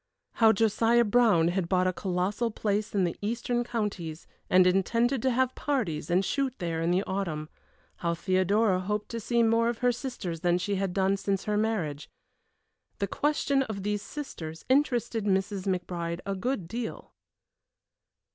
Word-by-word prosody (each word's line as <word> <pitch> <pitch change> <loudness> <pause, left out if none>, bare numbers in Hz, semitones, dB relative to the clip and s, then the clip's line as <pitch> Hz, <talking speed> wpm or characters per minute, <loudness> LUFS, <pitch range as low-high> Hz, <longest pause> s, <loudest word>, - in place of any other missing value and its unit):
How 225 -2 +5
Josiah 225 +2 +3
Brown 205 -7 +4
had 175 -1 -1
bought 185 -1 +2
a 185 - +1
colossal 190 +5 -1
place 210 -1 -2
in 195 - +3
the 175 - -1
eastern 240 +3 -1
counties, 200 -9 -4 0.2
and 185 0 +6
intended 230 +7 +2
to 260 - +2
have 260 +1 +1
parties 200 - -2
and 180 +3 +2
shoot 275 -3 -1
there 165 -3 -2
in 165 - +1
the 180 +2 +2
autumn. 165 -7 -3 0.5
How 170 -1 -1
Theodora 185 +3 +2
hoped 210 +3 -3
to 230 - -4
see 235 +2 +1
more 230 +1 +3
of 235 - -2
her 245 - +5
sisters 230 -9 -5
than 175 +1 +2
she 200 +3 -2
had 195 -2 -1
done 195 0 +2
since 195 -1 -1
her 210 - -1
marriage. 205 -10 -1 0.9
The 200 - 0
question 280 +4 +1
of 220 -7 -4
these 205 0 -1
sisters 170 - -7
interested 240 -5 +1
Mrs. 195 0 0
McBride 175 -2 -2
a 195 - -1
good 195 -2 -2
deal. 230 +4 -6
200 Hz, 165 wpm, -28 LUFS, 180-230 Hz, 0.9 s, and